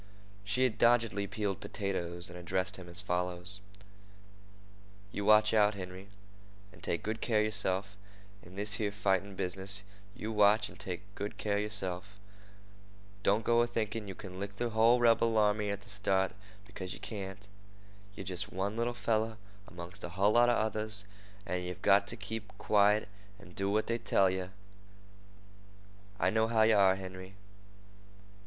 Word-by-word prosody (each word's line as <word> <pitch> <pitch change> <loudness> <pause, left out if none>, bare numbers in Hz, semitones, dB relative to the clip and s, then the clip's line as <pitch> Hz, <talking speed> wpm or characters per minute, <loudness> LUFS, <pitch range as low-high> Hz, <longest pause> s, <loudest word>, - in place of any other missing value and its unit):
She 100 +6 +1
had 120 -3 +1
doggedly 115 -4 +3
peeled 100 -2 -2
potatoes 85 -3 -3
and 90 - -10
addressed 90 +3 -2
him 90 -2 -10
as 85 +3 +1
follows: 90 +1 -2 1.5
"You 100 - -3
watch 105 0 +6
out, 105 -1 +4
Henry, 95 0 -8 0.7
an' - - -16
take 85 - -2
good 110 +1 -3
care 115 -3 +1
of - - +2
yerself 100 -2 0 0.5
in 90 +2 -14
this 105 +1 -1
here 105 -1 0
fighting 100 -1 0
business—you 100 +3 -4
watch, 105 0 +4
an' - - -14
take 90 +2 -5
good 100 +1 -5
care 100 -1 0
of - - +1
yerself. 100 -1 -2 1.0
Don't 105 +2 +2
go 120 0 +4
a 120 - +2
thinkin' 110 -2 -2
you 95 - -6
can 95 -2 -9
lick 100 0 -5
the 120 +2 -2
hull 115 +3 +5
rebel 115 -1 +4
army 105 -1 +3
at 100 0 -3
the 100 - -16
start, 95 -2 +1 0.3
because 95 -1 -7
yeh - - -9
can't. 100 -1 -6 0.7
Yer - - -6
jest 95 +2 -5
one 100 +3 -2
little 120 +1 -1
feller 110 -1 0 0.3
amongst 85 -1 -8
a 90 - -4
hull 95 +4 +2
lot 120 +2 +5
of 120 - +3
others, 110 -1 -2 0.4
and 90 -3 -2
yeh've 90 +1 -6
got 100 0 +5
to 115 - -2
keep 110 +1 -5
quiet 105 0 +3 0.3
an' 95 -3 -14
do 95 +2 -1
what 105 +2 +1
they 115 0 -1
tell 95 -4 +3
yeh. 95 0 -3 1.7
I - - +3
know 110 +1 +2
how 110 -1 +3
you 110 0 +5
are, 95 -2 +5
Henry. 95 0 -8
100 Hz, 165 wpm, -32 LUFS, 95-110 Hz, 1.7 s, watch